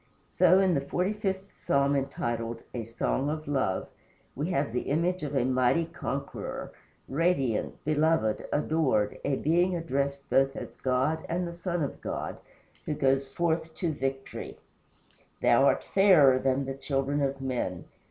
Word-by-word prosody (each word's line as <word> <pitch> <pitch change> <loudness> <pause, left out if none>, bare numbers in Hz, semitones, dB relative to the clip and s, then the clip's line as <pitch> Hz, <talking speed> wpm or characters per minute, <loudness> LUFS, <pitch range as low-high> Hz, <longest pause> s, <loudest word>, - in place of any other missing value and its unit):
So, 185 +1 +5
in 190 -2 +3
the 140 - +1
forty 180 +8 -1
fifth 195 -2 -3
Psalm, 140 +1 +1
entitled 120 -4 -2
"A 115 -3 -4
Song 120 +4 -1
of 155 0 -4
Love," 130 -10 0 0.5
we 150 +6 -2
have 140 -8 0
the 125 - 0
image 175 +5 +1
of 145 -1 -4
a 125 -2 +2
mighty 130 +5 +2
conqueror 140 -3 -5 0.4
radiant, 140 -6 0
beloved, 155 -7 +1
adored, 145 -9 +1
a 140 - +1
being 175 +6 +2
addressed 140 -4 -2
both 135 +1 +3
as - - -7
God 130 +5 0
and 175 +1 -1
the 170 - -6
Son 175 -1 -2
of 140 - -5
God, - - -4 0.5
who 150 - -1
goes 135 0 +2
forth 160 +2 -1
to 170 -3 -1
victory: 135 -1 -4 0.8
"Thou - - +5
art - - +2
fairer 155 -10 +6
than 135 +1 +1
the 135 - -3
children 135 +1 -1
of 135 0 -1
men. 125 -10 -3
140 Hz, 150 wpm, -28 LUFS, 135-165 Hz, 0.8 s, fairer